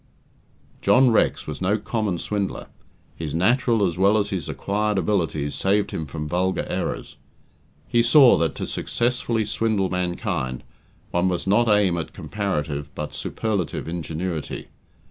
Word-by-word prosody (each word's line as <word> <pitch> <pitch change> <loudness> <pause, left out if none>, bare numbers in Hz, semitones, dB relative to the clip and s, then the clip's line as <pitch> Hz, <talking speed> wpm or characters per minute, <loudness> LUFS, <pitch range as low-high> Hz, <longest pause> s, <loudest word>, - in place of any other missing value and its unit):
John 130 -1 +5
Rex 110 - +2
was 75 +1 -6
no 95 +3 +2
common 105 -4 -2
swindler; 100 +2 -3 0.5
his 80 -2 -4
natural 115 +3 +3
as 90 -1 -2
well 100 +3 +5
as 100 -1 0
his 90 -6 -3
acquired 105 +1 -1
abilities 80 -6 0
saved 100 +2 +1
him 80 - -4
from 75 +2 -5
vulgar 90 +3 0
errors. - - -3 0.7
He 120 - +3
saw 125 +2 +7
that 80 -3 0
to - - -3
successfully 120 -2 -1
swindle 105 -3 0
mankind, 90 -8 -2 0.5
one 90 +1 +2
must 90 -2 -1
not 110 +4 +3
aim 100 -5 +3
at 80 -2 -6
comparative, 75 -8 -3
but 75 0 -5
superlative, 100 -9 -2
ingenuity. 80 -1 -4
95 Hz, 140 wpm, -23 LUFS, 80-105 Hz, 0.7 s, saw